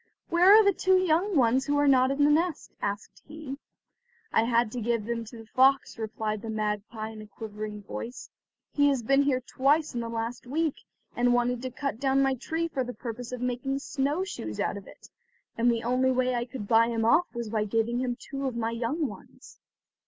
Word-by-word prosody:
"Where 350 +3 +6
are 435 +1 +9
the 400 - +5
two 375 +1 +3
young 370 +2 +1
ones 260 +2 +3
who 290 0 +1
are 290 0 +3
not 260 -1 +5
in 275 +1 +1
the 295 - +5
nest?" 325 +1 0
asked 205 +1 -4
he. 295 -2 -8 0.7
"I 225 - +4
had 235 -1 +2
to 245 - -4
give 230 -1 0
them 230 0 -3
to 230 +2 -11
the 225 - -11
fox," 265 +1 +2
replied 215 -1 -3
the 225 - -7
magpie 215 +1 -3
in 215 -1 -10
a 215 - -11
quivering 210 -1 -7
voice; 235 +5 -7 0.4
"he 285 -1 +4
has 270 -4 +1
been 275 +4 +4
here 275 -2 +1
twice 285 +5 +1
in 240 - -2
the 230 -1 -4
last 230 +2 -4
week, 310 +3 -1 0.4
and 245 0 +3
wanted 245 0 0
to 260 - -4
cut 270 -2 -4
down 270 0 +2
my 270 0 +2
tree 320 +6 -2
for 275 -5 -2
the 250 0 -7
purpose 240 0 -6
of 250 -1 -5
making 250 +2 -1
snow 285 +4 -1
shoes 110 - -6
out - - 0
of 200 -1 -9
it, - - -15 0.5
and 235 +1 +3
the 230 -1 -2
only 255 +2 +2
way 255 0 +1
I 240 -1 -1
could 240 -4 -7
buy 230 +1 +5
him 230 -1 -1
off 340 +10 +4
was 235 -2 -4
by 215 -2 0
giving 225 +3 0
him 250 -1 -2
two 275 -1 -4
of 255 - -4
my 230 -1 -1
young 250 +7 -1
ones." - - -13
245 Hz, 220 wpm, -27 LUFS, 230-275 Hz, 0.7 s, are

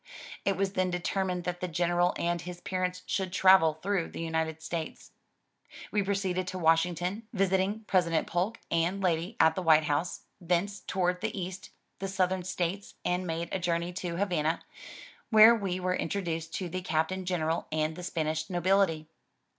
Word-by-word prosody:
It 195 -2 +1
was 195 0 0
then 185 -1 +1
determined 180 0 -1
that 175 0 -3
the 180 - -2
General 175 +1 +1
and 170 0 -1
his 175 0 -7
parents 185 0 -2
should 190 -2 -2
travel 185 -4 +5
through 195 -3 0
the - - -8
United 160 -1 -2
States. 160 -1 -5 0.8
We 210 - +2
proceeded 190 -2 -1
to 185 - -4
Washington, 175 +5 +1
visiting 195 +1 +1
President 170 -5 +2
Polk 185 +7 -1
and 170 +4 +1
lady 175 +4 0
at 160 0 +6
the 185 - -3
White 160 -3 +5
House, 150 +3 -1 0.2
thence 180 +3 0
toured 180 -1 -1
the 220 -2 -2
east, 185 +1 -6 0.3
the 195 - -3
southern 190 -1 0
states 185 +2 -3
and 180 +1 0
made 165 +1 -3
a 190 - -1
journey 170 0 -1
to 175 -1 -4
Havana, 170 -5 0 0.7
where 220 0 +9
we 195 -5 -2
were 185 0 0
introduced 165 -3 -2
to 185 - -3
the 185 +2 -4
Captain 180 +3 -1
General 165 -2 -1
and 155 0 0
the 180 - -7
Spanish 155 -2 -2
nobility. 175 -3 +2
180 Hz, 165 wpm, -29 LUFS, 165-190 Hz, 0.8 s, where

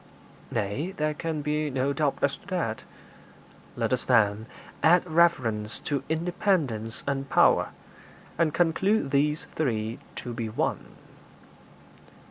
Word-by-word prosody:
'Nay; 120 - -2
there 155 0 0
can 155 -1 -3
be 150 +1 0
no 135 +1 0
doubt 145 -2 0
as 140 - +2
to - - -20
that.' 170 - -2 0.9
'Let - - 0
us, 125 - 0
then, 110 -2 +3 0.3
add 175 +3 +5
reverence 130 -11 +2
to 140 -3 -1
independence 160 - -1
and 140 -1 -2
power, - - +4 0.7
and 165 -2 +2
conclude 175 +1 +1
these 150 +2 +1
three 115 -6 -1 0.2
to 120 - -6
be 115 -1 -3
one.' 110 - -2
145 Hz, 120 wpm, -27 LUFS, 115-160 Hz, 0.9 s, add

